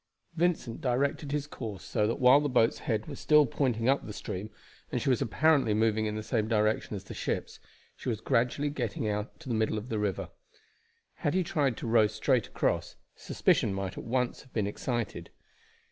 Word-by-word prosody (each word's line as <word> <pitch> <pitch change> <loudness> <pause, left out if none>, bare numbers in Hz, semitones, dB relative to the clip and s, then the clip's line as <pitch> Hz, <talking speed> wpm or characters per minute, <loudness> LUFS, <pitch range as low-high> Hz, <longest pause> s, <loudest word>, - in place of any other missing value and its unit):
Vincent 165 -7 0
directed 140 +2 0
his 145 -1 -1
course 110 -9 -7
so 105 -2 0
that 115 - -2
while 130 +2 +7
the 145 0 -1
boat's 120 -3 +3
head 110 -2 -1
was 140 -3 -8
still 150 -1 +5
pointing 120 -3 0
up 135 +1 +3
the 105 - -7
stream, 100 +1 -5 0.4
and - - 0
she 140 - +1
was 125 - +1
apparently 140 -3 +3
moving 110 0 +2
in 105 - -3
the 110 - -4
same 110 -1 0
direction 110 -1 +1
as 95 - -6
the - - -9
ships, - - -3 0.4
she - - -5
was 110 -3 -1
gradually 125 +6 +1
getting 120 -5 -2
out 105 0 -3
to 160 - -12
the 120 - -1
middle 110 -1 +1
of 105 +4 -6
the 110 - -1
river. 100 -3 -2 0.9
Had 145 - -1
he 185 - +3
tried 140 -7 0
to - - -6
row 110 -2 +5
straight 110 +2 +1
across - - -1 0.2
suspicion 95 - +1
might 95 -1 -3
at - - -7
once 125 +1 -1
have 130 - -21
been 105 -3 0
excited. 115 +2 -3
115 Hz, 200 wpm, -29 LUFS, 110-140 Hz, 0.9 s, while